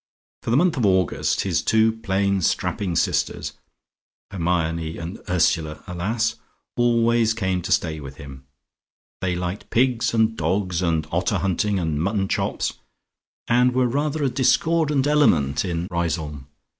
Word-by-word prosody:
For - - -5
the 120 - +3
month 170 0 +2
of 120 - +1
August, 95 -3 +1
his - - 0
two 110 0 +3
plain 100 -3 0
strapping 90 +1 -1
sisters - - 0 0.8
(Hermione 85 -3 -1
and 85 +4 -6
Ursula 80 -3 +1
alas!) 110 +6 -1 0.4
always 115 -1 +2
came 95 -5 -1
to 90 +3 -5
stay 80 -5 +1
with 70 -2 -9
him. 65 -1 -11 0.7
They 90 -1 0
liked 90 +2 -4
pigs 120 -1 +2
and 110 0 +2
dogs 90 0 -1
and 80 -3 0
otter 90 +4 0
hunting 100 +2 0
and 80 -4 -1
mutton 100 +2 0
chops, - - -1 0.7
and 125 +1 +3
were 130 -1 +3
rather 145 +4 -1
a 135 - +2
discordant 140 +3 +2
element 80 - +3
in 85 -2 -3
Riseholme. 80 -5 -3
95 Hz, 140 wpm, -23 LUFS, 85-115 Hz, 0.8 s, the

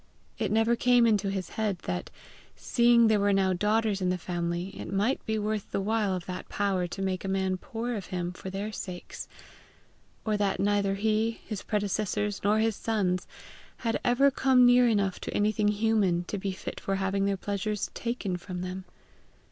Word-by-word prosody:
It 215 -4 0
never 225 +2 +3
came 245 0 +4
into 210 -3 +2
his 190 -2 -3
head 210 -4 -1
that, 90 -1 -3 0.5
seeing 235 -1 +4
there 220 -2 +4
were 200 0 +3
now 190 -1 +3
daughters 210 +1 +1
in 180 - +1
the 180 - +1
family, 175 +1 -3
it - - -7
might 205 +7 +1
be 220 0 0
worth 210 -1 -2
the - - -1
while 205 -1 +1
of 180 - -5
that 185 -1 -6
Power 195 -3 0
to 195 - -6
make 190 -1 -1
a 195 - -3 0.3
poor 230 +3 -5
man 240 - -1
of 195 - -7
him 180 -2 -3
for 185 +1 -8
their 200 +3 -4
sakes; 180 -4 -7 1.0
or 215 -1 +1
that 200 -1 0
neither 200 0 +2
he, 220 +2 0
his 215 -3 -5
predecessors, 210 0 -1
nor 205 +1 +3
his 220 -1 +2
sons, 195 -6 -1 0.6
had 225 - +1
ever 270 +3 +4
come 260 -2 +4
near 245 0 +6
enough 200 -5 +1
to - - -5
anything 210 0 +2
human 205 -4 +2
to 200 +3 -4
be 195 0 -2
fit 185 - -6
for 195 - -2
having 195 0 0
their 200 -1 0
pleasures 205 +2 -2
taken 230 -6 -3
from 180 0 -6
them. 185 +1 -5
205 Hz, 190 wpm, -28 LUFS, 190-220 Hz, 1.0 s, near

